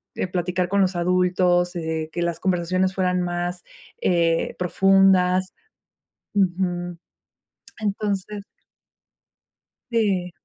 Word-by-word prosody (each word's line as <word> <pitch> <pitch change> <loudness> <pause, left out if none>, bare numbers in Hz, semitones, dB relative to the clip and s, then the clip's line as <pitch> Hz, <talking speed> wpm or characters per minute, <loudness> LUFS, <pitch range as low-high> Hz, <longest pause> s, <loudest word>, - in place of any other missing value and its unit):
eh, - - -2
platicar 180 0 -1
con 200 +2 +1
los 185 -1 +1
adultos, 180 0 +2
eh, 160 -1 -3
que 175 - -3
las 170 -1 -2
conversaciones 185 +1 0
fueran 180 -1 0
más, 175 0 -3 0.4
eh, 170 -2 +1
profundas. 185 0 +3 0.8
Ujú. 175 -2 0 0.8
Entonces 205 -1 -3 1.5
Sí 195 -6 +1
180 Hz, 90 wpm, -23 LUFS, 175-190 Hz, 1.5 s, profundas